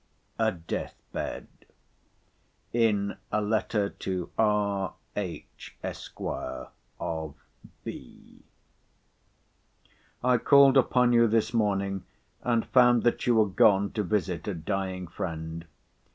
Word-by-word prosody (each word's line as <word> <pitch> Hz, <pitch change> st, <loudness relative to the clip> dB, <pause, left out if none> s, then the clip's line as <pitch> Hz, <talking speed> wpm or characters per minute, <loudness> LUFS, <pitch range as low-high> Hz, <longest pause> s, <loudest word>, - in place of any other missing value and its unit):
A 110 Hz, -1 st, +3 dB
DEATH 85 Hz, -3 st, -5 dB, 0.2 s
BED -, -, -4 dB, 1.3 s
IN 105 Hz, -4 st, +1 dB
A 105 Hz, -, +2 dB
LETTER 105 Hz, -1 st, 0 dB
TO 90 Hz, -2 st, -4 dB
R.H. 100 Hz, -3 st, -2 dB
ESQ. -, -, -7 dB, 0.8 s
OF 80 Hz, -3 st, -4 dB, 0.5 s
B—— -, -, -10 dB, 1.8 s
I 125 Hz, -1 st, +4 dB
called 140 Hz, +1 st, +6 dB
upon 125 Hz, -1 st, +4 dB
you 115 Hz, 0 st, +6 dB
this 115 Hz, +1 st, +1 dB
morning, 100 Hz, -4 st, 0 dB, 0.4 s
and 120 Hz, -2 st, +1 dB
found 120 Hz, -2 st, +5 dB
that 120 Hz, -, +1 dB
you 120 Hz, -, +4 dB
were 110 Hz, -1 st, +5 dB
gone 100 Hz, -1 st, +4 dB
to 110 Hz, -, -1 dB
visit 90 Hz, -4 st, -1 dB
a 100 Hz, -, -2 dB
dying 95 Hz, +2 st, -3 dB
friend. 80 Hz, -1 st, -5 dB
105 Hz, 105 wpm, -28 LUFS, 95-115 Hz, 1.8 s, called